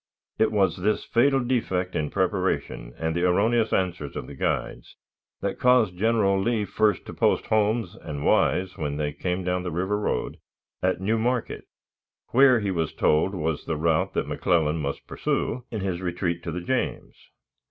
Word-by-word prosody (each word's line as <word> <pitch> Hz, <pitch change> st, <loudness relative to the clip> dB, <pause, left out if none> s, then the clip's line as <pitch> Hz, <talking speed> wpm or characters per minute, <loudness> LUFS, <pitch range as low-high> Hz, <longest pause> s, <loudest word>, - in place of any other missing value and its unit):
It 110 Hz, -, +3 dB
was 95 Hz, -5 st, +2 dB
this 105 Hz, +4 st, 0 dB
fatal 135 Hz, +3 st, +3 dB
defect 95 Hz, -8 st, -1 dB
in 75 Hz, -1 st, -1 dB
preparation, -, -, -1 dB
and 80 Hz, 0 st, -2 dB
the 85 Hz, -, 0 dB
erroneous 110 Hz, +5 st, +2 dB
answers 90 Hz, -6 st, -1 dB
of -, -, -4 dB
the -, -, -10 dB
guides, -, -, -3 dB, 0.5 s
that 100 Hz, -1 st, -3 dB
caused 125 Hz, -7 st, +4 dB
General 100 Hz, -1 st, +2 dB
Lee 110 Hz, 0 st, 0 dB
first 105 Hz, -2 st, +1 dB
to -, -, -8 dB
post -, -, +1 dB
Holmes 110 Hz, -2 st, +1 dB
and 75 Hz, -1 st, -5 dB
Wise, 95 Hz, 0 st, +2 dB
when 75 Hz, -2 st, -2 dB
they 75 Hz, -1 st, -2 dB
came 90 Hz, +5 st, -2 dB
down 90 Hz, 0 st, 0 dB
the 90 Hz, -, -4 dB
River 95 Hz, +5 st, -1 dB
road, 105 Hz, -, -2 dB, 0.4 s
at 95 Hz, 0 st, +1 dB
New 110 Hz, +4 st, 0 dB
Market, 120 Hz, +1 st, -1 dB, 0.6 s
where, 130 Hz, -2 st, +5 dB
he 100 Hz, -1 st, -1 dB
was 80 Hz, -3 st, -2 dB
told, 80 Hz, +6 st, +2 dB
was 80 Hz, -3 st, -2 dB
the 80 Hz, -, -2 dB
route 80 Hz, 0 st, +1 dB
that -, -, 0 dB
McClellan 80 Hz, -3 st, +1 dB
must 70 Hz, -1 st, -4 dB
pursue 125 Hz, +1 st, -2 dB
in 110 Hz, -3 st, -4 dB
his 95 Hz, -2 st, -2 dB
retreat 90 Hz, -1 st, -2 dB
to 85 Hz, -, -3 dB
the 90 Hz, +2 st, -4 dB
James. 130 Hz, +8 st, -2 dB
95 Hz, 175 wpm, -25 LUFS, 85-110 Hz, 0.6 s, where